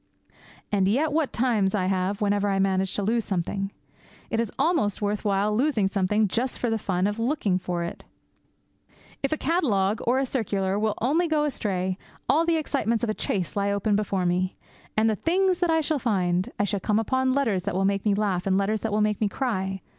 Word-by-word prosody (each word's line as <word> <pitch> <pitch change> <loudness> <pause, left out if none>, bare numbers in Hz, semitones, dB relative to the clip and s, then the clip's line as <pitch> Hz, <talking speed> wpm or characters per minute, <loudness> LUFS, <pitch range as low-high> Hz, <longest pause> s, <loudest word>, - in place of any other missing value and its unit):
And 195 -2 +2
yet, 280 +10 +2
what 310 -3 +1
times 220 -6 +1
I 185 -3 0
have 190 +2 -1
whenever 205 0 +1
I 195 - +1
manage 190 -1 +1
to 205 - -1
lose 230 +3 +1
something! 195 +1 -2 0.6
It 225 - 0
is 230 -3 -1
almost 315 - +1
worth 210 0 -1
while 205 0 +1
losing 240 -5 +2
something 200 +2 +1
just 240 +6 -1
for 240 - -1
the 225 - 0
fun 185 -2 0
of 205 +2 -1
looking 230 -7 0
for 175 -1 -3
it! 170 - -6 1.2
If 275 - -1
a 310 - +1
catalogue 220 - +1
or 245 +2 +3
a 270 - +1
circular 200 -6 -1
will 215 -1 0
only 320 +8 +2
go 310 -2 +1
astray, 190 -9 -1 0.3
all 315 +6 +3
the 335 -1 +3
excitements 235 -7 -1
of 225 - +1
a - - -1
chase 185 -4 -2
lie 200 0 +1
open 200 +1 +1
before 200 -3 0
me. 180 +1 0 0.4
And 220 +1 +4
the 220 - +2
things 365 - +1
that 350 -2 +1
I 320 0 +3
shall 310 -1 0
find! 185 -7 0
I - - +1
shall 205 0 0
come 210 +3 +1
on 260 0 +2
letters 225 -10 +1
that - - -2
will 190 +1 +1
make 195 0 +1
me 205 -2 +2
laugh 200 -3 -1
and 190 0 +3
letters 205 +2 0
that 225 - -2
will 210 +1 +1
make 210 0 0
me 210 - +2
cry. 190 -7 -2
210 Hz, 215 wpm, -25 LUFS, 195-250 Hz, 1.2 s, And